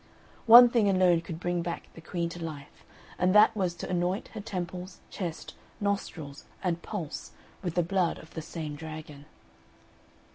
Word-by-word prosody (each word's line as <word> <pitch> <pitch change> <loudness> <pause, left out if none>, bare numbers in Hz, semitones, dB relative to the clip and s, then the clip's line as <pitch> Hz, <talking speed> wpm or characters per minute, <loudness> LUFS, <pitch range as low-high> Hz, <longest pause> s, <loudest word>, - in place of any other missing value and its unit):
One 240 +2 +11
thing 230 -4 +2
alone 185 -3 +4
could 165 -1 -7
bring 175 0 -1
back 170 0 -5
the 165 - -12
Queen 170 +1 -2
to 170 0 -7
life, 145 -3 -8 0.4
and 185 +2 +3
that 210 +2 +7
was 185 -4 -1
to - - -6
anoint 180 +3 -1
her 220 - -7
temples, 180 -1 -5
chest, 170 -5 -5 0.3
nostrils, 175 -8 -3 0.2
and 175 -2 -1
pulse 170 -7 -6 0.3
with 175 -3 -3
the 175 - +3
blood 175 0 0
of 160 - -14
the 160 - -4
same 155 -2 -6
dragon. 155 -2 -9
175 Hz, 160 wpm, -29 LUFS, 165-190 Hz, 0.4 s, One